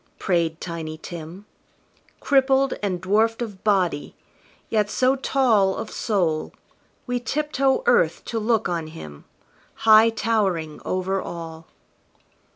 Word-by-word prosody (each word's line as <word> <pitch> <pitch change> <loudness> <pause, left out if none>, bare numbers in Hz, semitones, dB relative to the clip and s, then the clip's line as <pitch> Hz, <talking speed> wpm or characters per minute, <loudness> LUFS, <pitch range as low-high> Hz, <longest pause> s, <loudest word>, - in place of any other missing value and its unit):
prayed 170 -3 0
Tiny 160 -2 -6
Tim, 170 +4 -9 0.8
Crippled, 270 -1 +3
and 190 -4 -1
dwarfed 215 +5 +1
of 205 -5 -9
body, 185 -8 0 0.5
yet 210 -2 +1
so 260 +4 +2
tall 235 -8 +2
Of - - -6
soul, 175 -8 -1 0.5
we 245 -1 -1
tiptoe 275 - 0
earth 485 - +2
to 230 - -3
look 220 0 +1
on 170 -3 -3
him, 75 - -11 0.6
High 220 +1 +8
towering 200 -8 -1
over 185 +1 -1
all. 165 -1 -8
200 Hz, 115 wpm, -23 LUFS, 170-230 Hz, 0.8 s, High